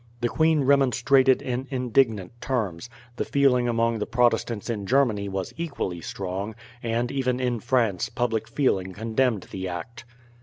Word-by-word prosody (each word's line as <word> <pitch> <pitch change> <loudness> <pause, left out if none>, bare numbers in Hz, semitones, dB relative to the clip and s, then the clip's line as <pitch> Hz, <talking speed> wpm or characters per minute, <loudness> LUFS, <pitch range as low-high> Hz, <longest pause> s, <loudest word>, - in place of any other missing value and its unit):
The 120 - +1
queen 160 0 +2
remonstrated 135 -1 +4
in 130 +1 -3
indignant 120 -7 +1
terms, 110 -6 -2 0.3
the - - 0
feeling 130 -3 +2
among 115 -1 +1
the 105 - -2
Protestants 115 -2 +1
in 105 -5 -3
Germany 115 -6 +2
was 95 -1 -4
equally 140 - -3
strong, 100 +4 -4 0.3
and 120 +1 -1
even 130 -2 0
in 125 -2 0
France 115 -7 +1
public 115 -3 -1
feeling 95 -10 0
condemned 115 +1 0
the 95 -1 -4
act. 90 +7 -7
120 Hz, 145 wpm, -25 LUFS, 105-130 Hz, 0.3 s, remonstrated